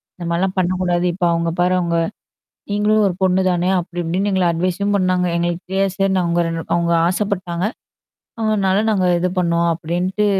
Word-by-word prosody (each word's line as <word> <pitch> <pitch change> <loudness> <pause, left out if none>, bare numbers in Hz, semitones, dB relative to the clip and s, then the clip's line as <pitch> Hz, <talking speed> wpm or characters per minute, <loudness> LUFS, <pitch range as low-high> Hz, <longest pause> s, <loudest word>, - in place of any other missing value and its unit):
இந்த 175 - -7
மாரிலாம் 185 +3 0
பண்ணக்கூடாது. 180 -1 0
இப்ப 175 0 -1
அவங்க 170 0 0
பாரு 180 +1 +3
அவங்க. 170 -1 0 0.7
நீங்களும் 210 +1 +2
ஒரு 180 - -2
பொண்ணு 190 0 +3
தானே! 175 +1 0
அப்படி 175 0 -5
இப்டின்னு" 185 +5 -1
எங்கள 190 -1 +2
அட்வைஸும் 185 +4 -1
பண்ணாங்க. 185 -1 +1
எங்களுக்கு 175 0 -2
தெரியாது 195 0 +1
சார் 195 -1 +2
அவங்க 170 0 +1
ரெ - - -2 0.2
அவங்க 170 0 +1
ஆசைப்பட்டாங்க. 185 -2 -2 0.8
அதனால 200 -3 +1
நாங்க 190 -3 +1
இது 180 +1 0
பண்ணோம் 170 -1 +1
அப்படின்ட்டு 175 +5 -1
180 Hz, 160 wpm, -19 LUFS, 170-190 Hz, 0.8 s, பாரு